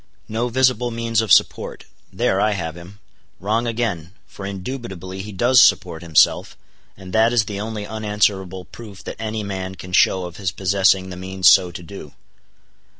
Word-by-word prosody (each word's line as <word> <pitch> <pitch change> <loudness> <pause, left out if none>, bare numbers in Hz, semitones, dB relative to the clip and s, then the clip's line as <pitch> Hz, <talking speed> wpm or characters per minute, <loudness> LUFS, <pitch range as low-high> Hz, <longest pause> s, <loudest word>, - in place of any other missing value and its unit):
No 115 +3 -2
visible 125 -1 +2
means 115 -1 0
of 110 -4 -3
support: - - +2 0.3
there 95 - 0
I 105 0 +2
have 80 -4 -4
him. 85 +4 -12 0.4
Wrong 110 +5 -1
again: 110 -8 -3
for 95 - -9
indubitably 95 -3 -6
he 105 +2 -8
does 120 +6 +4
support 85 -4 +3
himself, 80 -3 +2 0.4
and 95 -1 -11
that 110 +1 +4
is 115 -3 +2
the 100 0 -5
only 110 -1 -5
unanswerable 105 -4 -1
proof 105 -1 -12
that - - -7
any 110 -1 -3
man 95 -2 -5
can 90 0 -11
show 95 0 +3
of 90 0 -9
his 95 -3 -2
possessing 95 0 +1
the 90 - -7
means 95 0 0
so 90 - +5
to 85 0 -9
do. 80 -5 -10
100 Hz, 170 wpm, -21 LUFS, 95-110 Hz, 0.4 s, so